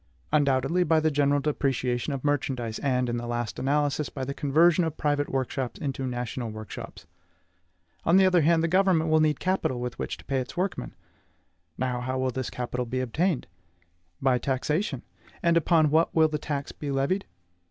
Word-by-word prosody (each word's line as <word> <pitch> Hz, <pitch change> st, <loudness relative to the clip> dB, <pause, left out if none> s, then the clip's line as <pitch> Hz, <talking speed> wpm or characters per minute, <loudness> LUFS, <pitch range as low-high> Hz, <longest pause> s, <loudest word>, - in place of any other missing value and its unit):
Undoubtedly, 145 Hz, +4 st, +2 dB
by 160 Hz, -1 st, +3 dB
the 155 Hz, 0 st, +1 dB
general 145 Hz, 0 st, +2 dB
depreciation 135 Hz, -3 st, -1 dB
of 135 Hz, -2 st, -4 dB
merchandise, 130 Hz, -6 st, -1 dB
and, 125 Hz, -3 st, +1 dB
in 120 Hz, 0 st, -1 dB
the 120 Hz, 0 st, -4 dB
last 120 Hz, -1 st, -3 dB
analysis, 145 Hz, +2 st, 0 dB
by 135 Hz, -2 st, -5 dB
the 140 Hz, -, -3 dB
conversion 160 Hz, +5 st, +3 dB
of 160 Hz, -2 st, -3 dB
private 145 Hz, -1 st, 0 dB
workshops 130 Hz, -1 st, -2 dB
into 135 Hz, -2 st, -3 dB
national 120 Hz, -1 st, -3 dB
workshops. 110 Hz, -2 st, -8 dB, 1.0 s
On 170 Hz, +3 st, +4 dB
the 190 Hz, -, +6 dB
other 180 Hz, -2 st, +4 dB
hand, 165 Hz, +1 st, +3 dB
the -, -, +2 dB
government 175 Hz, -3 st, +3 dB
will 155 Hz, -, +5 dB
need 155 Hz, -2 st, +2 dB
capital 185 Hz, -9 st, 0 dB
with 125 Hz, 0 st, -5 dB
which -, -, -3 dB
to -, -, -16 dB
pay 135 Hz, -1 st, 0 dB
its 130 Hz, +5 st, -6 dB
workmen; 180 Hz, -, -2 dB, 0.8 s
now, 125 Hz, -1 st, -1 dB
how 130 Hz, +1 st, -2 dB
will 130 Hz, 0 st, 0 dB
this 130 Hz, 0 st, -3 dB
capital 125 Hz, 0 st, -3 dB
be 130 Hz, +2 st, -2 dB
obtained? 150 Hz, +6 st, 0 dB, 0.7 s
By 130 Hz, -2 st, +2 dB
taxation. 140 Hz, -, -1 dB, 0.4 s
And 170 Hz, -1 st, +4 dB
upon 160 Hz, -2 st, +3 dB
what 160 Hz, +2 st, +2 dB
will 160 Hz, -1 st, +5 dB
the 150 Hz, -1 st, -2 dB
tax 145 Hz, -2 st, -4 dB
be 145 Hz, -, -6 dB
levied? 140 Hz, +8 st, 0 dB
140 Hz, 180 wpm, -27 LUFS, 125-160 Hz, 1.0 s, the